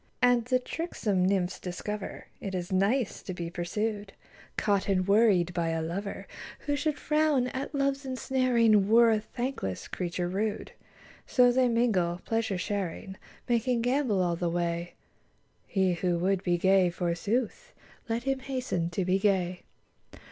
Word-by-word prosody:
72 -, -, +8 dB
And 235 Hz, -2 st, 0 dB
the 255 Hz, +1 st, +3 dB
tricksome 210 Hz, -, -1 dB
nymphs 190 Hz, -2 st, 0 dB
discover 195 Hz, +3 st, -5 dB
It 195 Hz, -2 st, -5 dB
is 180 Hz, 0 st, -4 dB
nice 200 Hz, +5 st, +1 dB
to 185 Hz, -, -6 dB
be 170 Hz, -1 st, -5 dB
pursued, 205 Hz, +4 st, -3 dB, 0.4 s
Caught 200 Hz, -2 st, +1 dB
and 185 Hz, -1 st, +1 dB
worried 200 Hz, -5 st, +4 dB
by 170 Hz, -1 st, 0 dB
a 165 Hz, 0 st, -1 dB
lover; 195 Hz, +5 st, -4 dB, 0.4 s
Who 290 Hz, -, -1 dB
should 290 Hz, 0 st, -1 dB
frown 300 Hz, -5 st, +2 dB
at 270 Hz, +4 st, -5 dB
Love's 275 Hz, 0 st, 0 dB
ensnaring 250 Hz, -6 st, +2 dB
Were 230 Hz, +1 st, +6 dB
a 215 Hz, -, +2 dB
thankless 240 Hz, -, -4 dB
creature 175 Hz, -1 st, -3 dB
rude; 205 Hz, +4 st, -2 dB, 0.6 s
So 245 Hz, -1 st, +5 dB
they 255 Hz, 0 st, +3 dB
mingle, 195 Hz, -8 st, +1 dB
pleasure 225 Hz, -4 st, 0 dB
sharing, 190 Hz, 0 st, -3 dB, 0.3 s
Making 240 Hz, 0 st, +1 dB
gambol 245 Hz, -6 st, +1 dB
all 175 Hz, -1 st, 0 dB
the 170 Hz, 0 st, -1 dB
way: 170 Hz, 0 st, -2 dB, 0.7 s
He 190 Hz, -3 st, +1 dB
who 175 Hz, 0 st, 0 dB
would 185 Hz, +2 st, +1 dB
be 175 Hz, -2 st, +1 dB
gay, 190 Hz, 0 st, +4 dB
forsooth. 200 Hz, -, -2 dB, 0.4 s
Let 230 Hz, +1 st, -1 dB
him 270 Hz, 0 st, 0 dB
hasten 255 Hz, -11 st, -2 dB
to 180 Hz, +2 st, -2 dB
be 185 Hz, +1 st, +2 dB
gay. 185 Hz, -3 st, +1 dB
200 Hz, 150 wpm, -29 LUFS, 180-245 Hz, 0.7 s, 72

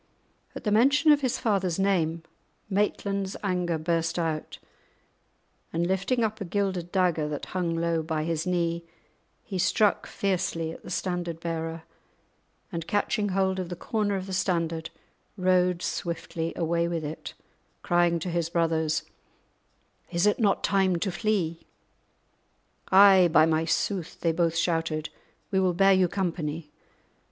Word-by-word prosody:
At -, -, -7 dB
the 210 Hz, -, 0 dB
mention 280 Hz, +8 st, +5 dB
of 290 Hz, -1 st, +4 dB
his 255 Hz, -3 st, 0 dB
father's 190 Hz, -6 st, 0 dB
name 170 Hz, -4 st, +1 dB, 0.5 s
Maitland's 200 Hz, -1 st, -1 dB
anger 180 Hz, -4 st, 0 dB
burst 165 Hz, +1 st, -1 dB
out, 160 Hz, -3 st, -2 dB, 1.1 s
and 170 Hz, +1 st, 0 dB
lifting 195 Hz, +7 st, 0 dB
up 220 Hz, 0 st, -2 dB
a -, -, 0 dB
gilded 185 Hz, -2 st, -2 dB
dagger 175 Hz, -5 st, +1 dB
that 145 Hz, -1 st, -4 dB
hung 175 Hz, -3 st, -1 dB
low 165 Hz, 0 st, 0 dB
by 160 Hz, -1 st, -2 dB
his 165 Hz, +1 st, -2 dB
knee, 170 Hz, -1 st, 0 dB, 0.6 s
he 190 Hz, -3 st, -5 dB
struck 210 Hz, +3 st, +2 dB
fiercely 180 Hz, -4 st, -1 dB
at -, -, -10 dB
the -, -, -11 dB
standard 175 Hz, -3 st, -3 dB
bearer, 165 Hz, -1 st, -4 dB, 0.9 s
and, 170 Hz, -3 st, -5 dB
catching 205 Hz, 0 st, 0 dB
hold 190 Hz, 0 st, +1 dB
of 180 Hz, -2 st, -4 dB
the 175 Hz, -, -4 dB
corner 205 Hz, +2 st, -1 dB
of 190 Hz, -1 st, -3 dB
the 190 Hz, -, -6 dB
standard, 170 Hz, -3 st, -1 dB, 0.5 s
rode 180 Hz, -1 st, +2 dB
swiftly 165 Hz, -1 st, -3 dB
away 170 Hz, 0 st, 0 dB
with 170 Hz, -2 st, -2 dB
it, 155 Hz, +2 st, -7 dB, 0.5 s
crying 175 Hz, -1 st, +3 dB
to 170 Hz, +2 st, -4 dB
his 170 Hz, -1 st, -1 dB
brothers, 160 Hz, -2 st, +1 dB, 1.1 s
"Is 170 Hz, +2 st, +1 dB
it 210 Hz, -, +2 dB
not 205 Hz, -4 st, +2 dB
time 190 Hz, -2 st, +2 dB
to 185 Hz, +3 st, -1 dB
flee?" 175 Hz, -4 st, -1 dB, 1.2 s
"Ay, 190 Hz, -2 st, +7 dB
by 160 Hz, -1 st, +6 dB
my 160 Hz, 0 st, +1 dB
sooth," 180 Hz, +1 st, -1 dB
they 165 Hz, -, +2 dB
both 165 Hz, 0 st, +1 dB
shouted, 165 Hz, -2 st, 0 dB, 0.4 s
"we 190 Hz, -, +2 dB
will 185 Hz, -2 st, +2 dB
bear 195 Hz, +2 st, +5 dB
you 185 Hz, -1 st, +4 dB
company." 165 Hz, -5 st, -3 dB
175 Hz, 145 wpm, -27 LUFS, 165-195 Hz, 1.2 s, Ay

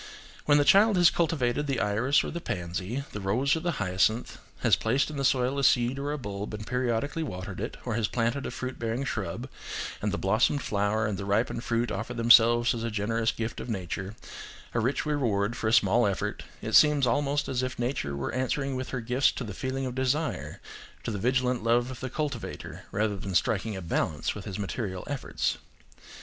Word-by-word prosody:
When 145 Hz, -1 st, +5 dB
the 145 Hz, -, +3 dB
child 200 Hz, +5 st, +6 dB
has 175 Hz, -1 st, +6 dB
cultivated 145 Hz, -4 st, 0 dB
the 135 Hz, -3 st, 0 dB
iris 115 Hz, +7 st, +2 dB
or -, -, -4 dB
the 170 Hz, -, -5 dB
pansy, 90 Hz, -, -3 dB
the 105 Hz, -, -5 dB
rose 120 Hz, +10 st, +2 dB
or -, -, -1 dB
the 175 Hz, +1 st, -1 dB
hyacinth, 100 Hz, +2 st, 0 dB, 0.2 s
has -, -, +5 dB
placed 130 Hz, +7 st, +1 dB
in 150 Hz, -, -6 dB
the 140 Hz, -, -1 dB
soil 130 Hz, 0 st, +2 dB
a -, -, -1 dB
seed 125 Hz, +1 st, +3 dB
or 145 Hz, +1 st, -2 dB
a 150 Hz, -, -2 dB
bulb 105 Hz, -4 st, -5 dB
and 105 Hz, 0 st, -7 dB
periodically 125 Hz, +5 st, -1 dB
watered 95 Hz, -, -5 dB
it, -, -, -4 dB
or -, -, -1 dB
has 110 Hz, -2 st, +1 dB
planted 120 Hz, +5 st, -1 dB
a -, -, -3 dB
fruit 130 Hz, 0 st, -5 dB
bearing 115 Hz, +3 st, -1 dB
shrub, 115 Hz, -1 st, -3 dB, 0.5 s
and 105 Hz, -, 0 dB
the 100 Hz, -, -1 dB
blossomed 110 Hz, +8 st, +2 dB
flower 105 Hz, +2 st, 0 dB
and 105 Hz, -3 st, -2 dB
the -, -, -3 dB
ripened 110 Hz, +3 st, 0 dB
fruit 120 Hz, 0 st, 0 dB
offer 120 Hz, -, -4 dB
themselves 120 Hz, 0 st, +6 dB
as 115 Hz, -1 st, -4 dB
a 115 Hz, -, -1 dB
generous 110 Hz, +2 st, 0 dB
gift 115 Hz, 0 st, -4 dB
of -, -, -6 dB
nature, 95 Hz, 0 st, -4 dB, 0.6 s
a 120 Hz, -, +1 dB
rich 130 Hz, +5 st, 0 dB
reward 115 Hz, -8 st, 0 dB
for 110 Hz, -, -2 dB
a -, -, +2 dB
small 115 Hz, 0 st, +4 dB
effort; 100 Hz, +1 st, -2 dB, 0.2 s
it 110 Hz, -, -4 dB
seems 150 Hz, -3 st, +6 dB
almost 145 Hz, +4 st, +1 dB
as 130 Hz, -1 st, -1 dB
if 130 Hz, 0 st, -3 dB
nature 120 Hz, -, -2 dB
were 70 Hz, -, -3 dB
answering 135 Hz, +1 st, -1 dB
with 130 Hz, 0 st, -4 dB
her 125 Hz, -, -3 dB
gifts 125 Hz, +4 st, +2 dB
to -, -, -5 dB
the 105 Hz, -4 st, -6 dB
feeling 130 Hz, +5 st, -3 dB
of 125 Hz, -, -3 dB
desire, 130 Hz, +4 st, -1 dB, 0.4 s
to -, -, -3 dB
the 105 Hz, -, -3 dB
vigilant 125 Hz, +1 st, +1 dB
love 120 Hz, +2 st, +2 dB
of 130 Hz, -, -8 dB
the 130 Hz, -, -4 dB
cultivator, 140 Hz, -3 st, -5 dB
rather 105 Hz, 0 st, 0 dB
than 95 Hz, -1 st, -5 dB
striking 110 Hz, +2 st, +1 dB
a 95 Hz, -, -6 dB
balance 80 Hz, -2 st, -1 dB
with 105 Hz, -, -8 dB
his 100 Hz, -4 st, -5 dB
material 100 Hz, -2 st, -3 dB
efforts. 145 Hz, -2 st, -2 dB
120 Hz, 210 wpm, -28 LUFS, 105-135 Hz, 0.6 s, child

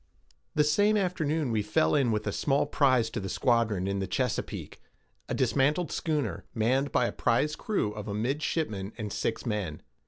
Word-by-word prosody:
The 150 Hz, -, +5 dB
same 205 Hz, +8 st, +3 dB
afternoon 160 Hz, -, 0 dB
we 110 Hz, -2 st, +1 dB
fell 100 Hz, -6 st, +2 dB
in 130 Hz, -5 st, +3 dB
with 105 Hz, -1 st, -1 dB
a 100 Hz, -, 0 dB
small 140 Hz, +7 st, +1 dB
prize 130 Hz, -6 st, +2 dB
to -, -, -3 dB
the 95 Hz, -1 st, -4 dB
squadron 115 Hz, -7 st, +1 dB
in 100 Hz, 0 st, -1 dB
the 95 Hz, -, -2 dB
Chesapeake, 125 Hz, -4 st, -3 dB, 0.5 s
a -, -, -1 dB
dismantled 140 Hz, +6 st, +1 dB
schooner, 150 Hz, -3 st, -1 dB
manned 130 Hz, +5 st, +1 dB
by 125 Hz, -, +3 dB
a -, -, -1 dB
prize 140 Hz, +6 st, +1 dB
crew 200 Hz, -, -1 dB
of 105 Hz, -1 st, -7 dB
a 100 Hz, -, -3 dB
midshipman 115 Hz, -, -2 dB
and 105 Hz, -3 st, -4 dB
six 115 Hz, -, -2 dB
men. 105 Hz, -9 st, -3 dB
120 Hz, 180 wpm, -29 LUFS, 105-150 Hz, 0.5 s, The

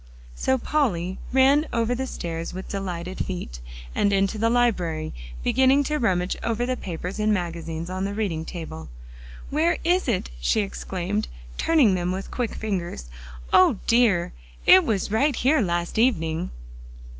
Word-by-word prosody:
So 260 Hz, -, +1 dB
Polly 190 Hz, -, 0 dB
ran 275 Hz, +4 st, +4 dB
over 230 Hz, 0 st, +1 dB
the 260 Hz, +2 st, -2 dB
stairs 165 Hz, -5 st, -5 dB
with 190 Hz, -, -6 dB
delighted 185 Hz, -2 st, -4 dB
feet, 175 Hz, -, -6 dB, 0.3 s
and 200 Hz, -, +2 dB
into 195 Hz, +2 st, +1 dB
the 225 Hz, +1 st, +2 dB
library, 185 Hz, -10 st, +1 dB, 0.3 s
beginning 265 Hz, -, +4 dB
to 300 Hz, +2 st, -1 dB
rummage 180 Hz, -5 st, +1 dB
over 230 Hz, +1 st, -1 dB
the 255 Hz, +1 st, -1 dB
papers 180 Hz, -1 st, -5 dB
and 215 Hz, 0 st, +2 dB
magazines 170 Hz, -3 st, -3 dB
on 185 Hz, +1 st, -3 dB
the 200 Hz, +1 st, -3 dB
reading 185 Hz, -7 st, -1 dB
table. 155 Hz, -, -7 dB, 0.6 s
"Where 315 Hz, +4 st, +2 dB
is 355 Hz, 0 st, +2 dB
it?" 205 Hz, -, -1 dB
she -, -, +2 dB
exclaimed, 195 Hz, +1 st, -3 dB, 0.3 s
turning 295 Hz, -11 st, +4 dB
them 180 Hz, -1 st, 0 dB
with 190 Hz, +1 st, -5 dB
quick 245 Hz, -4 st, -2 dB
fingers. 175 Hz, -, -4 dB, 0.4 s
"O 185 Hz, +3 st, +6 dB
dear! 230 Hz, -8 st, +3 dB, 0.3 s
it 185 Hz, -, +8 dB
was 205 Hz, -3 st, -1 dB
right 275 Hz, +5 st, +2 dB
here 270 Hz, +4 st, +3 dB
last 175 Hz, 0 st, -1 dB
evening." 170 Hz, -9 st, +1 dB
195 Hz, 150 wpm, -24 LUFS, 175-245 Hz, 0.6 s, it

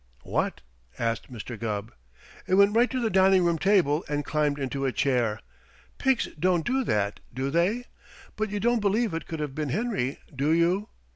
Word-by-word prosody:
"What?" -, -, -1 dB, 0.4 s
asked 115 Hz, +2 st, -2 dB
Mr. 120 Hz, -1 st, -7 dB
Gubb. 110 Hz, -1 st, -3 dB, 0.5 s
"It 185 Hz, -, +3 dB
went 200 Hz, +2 st, +5 dB
right 240 Hz, +2 st, +4 dB
to 260 Hz, -, -2 dB
the 225 Hz, -3 st, 0 dB
dining 190 Hz, -1 st, +5 dB
room 170 Hz, -2 st, +1 dB
table 180 Hz, -6 st, +3 dB
and 145 Hz, -1 st, -1 dB
climbed 150 Hz, -1 st, 0 dB
into 135 Hz, 0 st, -3 dB
a -, -, 0 dB
chair. 120 Hz, -6 st, +1 dB, 0.6 s
Pigs 265 Hz, -3 st, +2 dB
don't 175 Hz, -1 st, +2 dB
do 265 Hz, +2 st, +1 dB
that, 100 Hz, -1 st, 0 dB
do 130 Hz, +2 st, -3 dB
they? 190 Hz, -, +1 dB, 0.5 s
But 215 Hz, 0 st, -2 dB
you 205 Hz, +1 st, -2 dB
don't 240 Hz, +2 st, +2 dB
believe 210 Hz, 0 st, +1 dB
it 165 Hz, -, -4 dB
could 160 Hz, -, -5 dB
have 150 Hz, -3 st, -3 dB
been 150 Hz, 0 st, -3 dB
Henry, 195 Hz, -, -1 dB, 0.2 s
do 140 Hz, +3 st, 0 dB
you? 175 Hz, +5 st, +2 dB
165 Hz, 185 wpm, -27 LUFS, 135-205 Hz, 0.6 s, went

